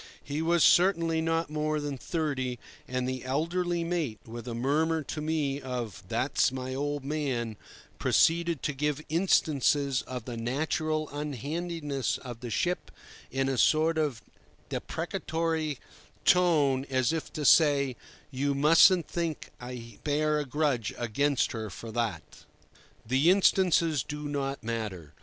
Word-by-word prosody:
He 145 +2 -3
was 170 0 +3
certainly 165 -3 +4
not 165 -1 0
more 155 0 0
than 145 -1 -3
thirty, 135 -4 -2 0.3
and 130 0 -2
the 130 -1 -3
elderly 170 +6 -1
mate, 165 -10 -2
with 115 +1 -8
a 115 - -4
murmur 155 +6 +1
to 150 - -5
me 150 -3 -1
of 125 -7 -5
"That's - - +1
my 130 0 -4
old 145 0 -2
man," 135 -7 -2 0.4
proceeded 170 -2 +2
to 145 - 0
give 150 +2 -1
instances 145 -5 +2
of 125 -3 -6
the 120 -2 -5
natural 155 +5 -1
unhandiness 150 +1 -3
of 120 -3 -8
the 120 -1 -6
ship 180 +9 -1 0.4
in 135 +1 0
a 135 -2 0
sort 160 +1 +3
of 135 -8 -1 0.5
deprecatory 160 -2 -2 0.5
tone, 150 -7 +4
as 130 0 +1
if 160 - -4
to 150 - -3
say, 140 -5 +5 0.4
"You 140 +1 0
mustn't 165 +4 +6
think 170 -3 -3
I 120 -3 -8
bear 150 0 +1
a 150 - -2
grudge 135 -5 -1
against 135 +4 +1
her 110 -2 -4
for 115 +4 -8
that." 110 -8 -4 0.6
The 130 +8 +3
instances 180 -5 +4
do 150 +2 -5
not 140 -2 -3
matter. 105 -10 -4
145 Hz, 140 wpm, -29 LUFS, 130-160 Hz, 0.6 s, mustn't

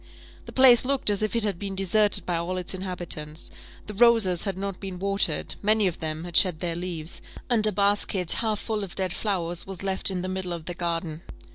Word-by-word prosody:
The - - -7
place 260 -2 +6
looked 265 -4 +1
as 205 - 0
if 215 +1 -1
it 230 - +1
had 200 -5 -2
been 195 -1 -5
deserted 195 0 +2
by 175 - -1
all 175 +2 -3
its 180 +1 -2
inhabitants: 175 -4 -4 0.3
the 210 - -7
roses 220 -5 +4
had 195 -2 -2
not 195 -1 -4
been 190 -2 -6
watered, 195 +2 -1
many 215 0 +3
of 180 -3 -1
them 155 0 -4
had 175 -1 -8
shed 180 -3 +4
their 170 0 -3
leaves; 170 -2 -5 0.3
and 215 -3 +4
a - - +2
basket 200 -3 +2
half 220 -2 +2
full 215 -2 -3
of 190 - -8
dead 185 -2 -1
flowers 175 -5 -2
was 195 -1 -7
left 190 0 0
in 180 -2 -3
the - - -3
middle 185 -1 -3
of 165 -2 -7
the 175 - -3
garden. 170 -2 -3
190 Hz, 220 wpm, -26 LUFS, 175-205 Hz, 0.3 s, place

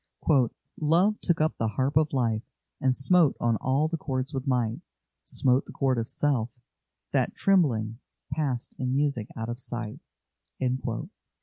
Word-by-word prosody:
"Love 175 +8 +3
took 170 -2 +1
up 155 +1 +2
the 115 - +1
harp 130 +6 -1
of 155 0 +3
life, 115 -5 +1 0.4
and 130 -1 +2
smote 165 +3 +4
on 120 -1 +2
all 135 +6 +1
the 165 +1 -2
chords 135 -1 -2
with 135 0 -3
might 120 -4 +1 0.4
Smote 130 0 +1
the - - -8
chord 130 -3 +1
of 115 - -3
Self, 125 -6 0 0.6
that, - - +1
trembling, 120 - +2 0.3
passed 140 -5 -2
in 130 0 0
music 140 -6 0
out 115 0 -3
of 120 +1 -4
sight." 120 -3 -5
130 Hz, 145 wpm, -27 LUFS, 120-150 Hz, 0.6 s, smote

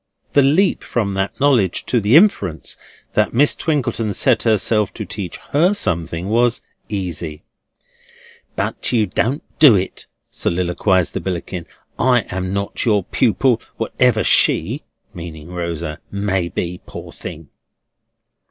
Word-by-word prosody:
The 140 - +6
leap 155 +8 +3
from 105 -5 -2
that 95 0 -2
knowledge 125 -10 +2
to 120 - +2
the 105 +6 +3
inference 105 - +3 0.4
that - - +1
Miss 145 +4 +4
Twinkleton 125 -9 -1
set 130 -4 +2
herself 110 -1 +2
to - - -5
teach 95 -5 -6
her 175 +8 +3
something, 85 - -2
was 120 +2 +2 0.3
easy. 85 -6 -4 1.1
"But - - -2
you 115 -4 +3
don't 120 +8 -1 0.2
do 145 -8 +8
it," 95 0 -2 0.2
soliloquised 90 +1 0
the - - -3
Billickin; 90 -1 -4 0.3
"I 125 -1 +4
am 95 0 -3
not 100 0 -2
your 105 -4 +2
pupil, 120 +3 +2 0.2
whatever 115 0 +1
she," - - +2 0.3
meaning 85 -2 -9
Rosa, 85 -2 -4
"may 100 -3 -1
be, 90 0 -4
poor - - -9
thing!" 75 -1 -9
100 Hz, 130 wpm, -19 LUFS, 90-120 Hz, 1.1 s, do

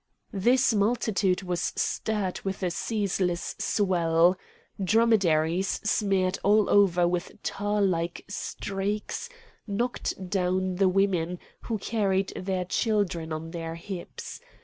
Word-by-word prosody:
This 245 +6 +3
multitude 205 -3 +1
was 180 -1 -1
stirred 205 -4 -1
with 195 0 -4
a 180 - +1
ceaseless 190 -4 -1
swell. 175 -3 +3 0.5
Dromedaries, 190 -5 +2
smeared 195 -3 +1
all 210 0 +4
over 180 -4 +5
with 175 0 -2
tar 205 0 0
like 170 -3 -1
streaks, 200 - -3 0.4
knocked 205 -3 -2
down 185 -1 0
the 195 -1 +4
women, 180 -3 +1 0.3
who 225 - -1
carried 195 -2 0
their 185 -1 -2
children 185 -6 0
on 160 +1 -4
their 165 -1 -5
hips. 175 +1 -7
190 Hz, 110 wpm, -27 LUFS, 180-205 Hz, 0.5 s, over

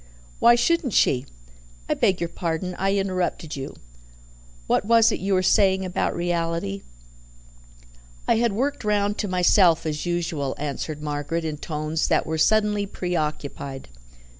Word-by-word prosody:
"Why 235 - +6
shouldn't 280 - +1
she?" 125 -2 +2 0.6
"I - - +1
beg 190 -2 +1
your 170 - -1
pardon, 170 +1 -3
I 195 +1 +1
interrupted 185 -5 -2
you. 135 -1 -6 0.9
What - - +1
was 230 +1 +5
it - - -2
you 195 0 0
were 185 - +2
saying 190 0 +3
about 180 - -1
reality?" 165 - -2 1.5
"I - - +3
had 235 0 +2
worked 280 +7 -1
round 205 -1 0
to 210 - -1
myself, 180 -2 +4
as 155 +2 -3
usual," 165 -6 -2
answered 150 +1 -4
Margaret 150 +3 -3
in 155 -1 -3
tones 155 0 -2
that - - +2
were 160 0 -3
suddenly 210 +2 +2
preoccupied. 150 - -4
175 Hz, 140 wpm, -24 LUFS, 155-200 Hz, 1.5 s, Why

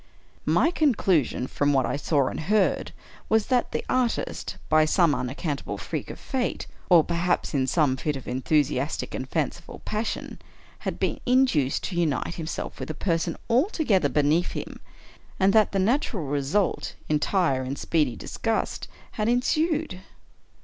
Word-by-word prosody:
My 330 - +3
conclusion, 195 - +2
from 145 +2 0
what 135 -2 +3
I 115 - -1
saw 145 -1 +1
and - - -3
heard, 200 +4 +1 0.4
was, 220 -1 +3
that 250 -2 +1
the - - -3
artist, 255 -2 -1
by 155 0 +5
some 160 0 +3
unaccountable 140 +4 -3
freak - - -5
of - - -8
fate, 260 -4 -2 0.2
or 170 -3 +7
perhaps 175 +1 0
in 130 -2 +1
some 145 -3 +2
fit 150 +2 -2
of 135 - -8
enthusiastic 140 +2 0
and 130 - -5
fanciful 165 +3 -3
passion, 215 +1 -3 0.4
had - - -4
been - - -1
in 255 +2 +5
duced 145 - 0
to 175 -2 -2
unite 160 -1 0
himself 160 -2 -5
with - - -5
a 155 - -4
person 170 -1 -1
altogether 235 - +2
beneath 150 +4 +2
him, - - -6 0.6
and 195 0 +4
that 215 -2 +4
the 200 - -1
natural 210 - +1
result, 145 +8 0
entire 155 -2 +1
and 130 +2 -4
speedy 150 -7 0
disgust, 225 -1 -2 0.2
had 215 +1 -1
ensued. 305 - 0
170 Hz, 150 wpm, -26 LUFS, 145-215 Hz, 0.6 s, or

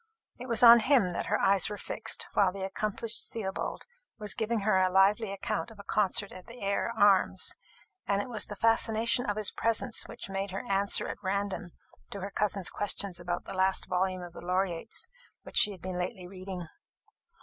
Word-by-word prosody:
It 250 - -7
was 235 0 +2
on 235 0 +10
him 245 -6 +3
that - - -4
her - - +1
eyes 195 -1 +3
were 210 - -5
fixed - - -4
while 195 -3 +3
the 195 0 -6
accomplished 215 +3 -3
Theobald 195 -4 -4 0.3
was 210 -3 -1
giving 225 -1 -1
her 205 0 +2
a 185 0 +3
lively 195 +3 +3
account 185 -4 -3
of 225 - -14
a 200 - -10
concert 200 -1 +1
at 185 - -12
the 240 +1 -11
Eyre 200 +3 0
Arms; 200 -2 +4 0.5
and 200 0 +1
it 205 - -3
was 230 -4 -1
the 210 - -7
fascination 225 +2 +2
of 205 0 -1
his 215 -2 -1
presence 230 +1 0
which 235 - -8
made 195 +1 -3
her 190 - -5
answer 200 +1 +3
at - - -7
random 195 -2 -2 0.4
to 200 - -7
her 200 +1 -5
cousin's 200 -3 +1
questions 200 -3 -1
about 175 0 -4
the - - -7
last 190 0 +1
volume 185 0 -1
of 175 -1 -10
the - - -10
Laureate's, 180 +2 -1 0.4
which - - -5
she 210 - +6
had 190 - -11
been 185 -1 -4
lately 180 +1 -4
reading. 185 -1 -7
200 Hz, 195 wpm, -29 LUFS, 185-215 Hz, 0.5 s, on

